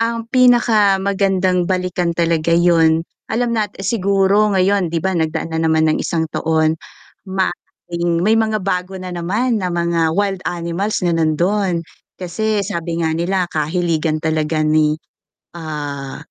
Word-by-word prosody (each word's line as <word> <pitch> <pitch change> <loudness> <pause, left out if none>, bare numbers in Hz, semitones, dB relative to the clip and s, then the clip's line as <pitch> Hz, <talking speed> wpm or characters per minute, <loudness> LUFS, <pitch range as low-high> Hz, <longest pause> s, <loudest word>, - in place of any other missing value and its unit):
Ang 230 0 -1
pinakamagandang 200 -7 +3
balikan 180 -2 -1
talaga 165 -1 +1
yun, 165 -2 +3 0.2
alam 235 +1 0
nat 215 -3 -2
siguro 200 0 +2
ngayon 190 -1 +2
'di 165 - 0
ba? 190 - +1
Nagdaan 160 -1 -2
na 160 - -1
naman 160 -1 +2
ng 155 - +1
isang 165 -1 -1
taon, 160 0 +1 0.5
ma 190 -1 0 0.4
may 170 +5 +1
mga 215 -3 -1
bago 185 0 -2
na 185 -1 -7
naman 210 +7 -1
na 185 - -1
mga 170 -1 0
wild 200 -2 0
animals 175 +4 -2
na 175 - +2
nandun, 170 +3 0 0.3
kasi 205 +3 -1
sabi 170 -3 -3
nga 160 - +1
nila 180 +3 0
kahiligan 160 0 0
talaga 155 0 0
ni, 155 0 +2 0.6
ah, 145 -4 -6
175 Hz, 135 wpm, -18 LUFS, 160-195 Hz, 0.6 s, pinakamagandang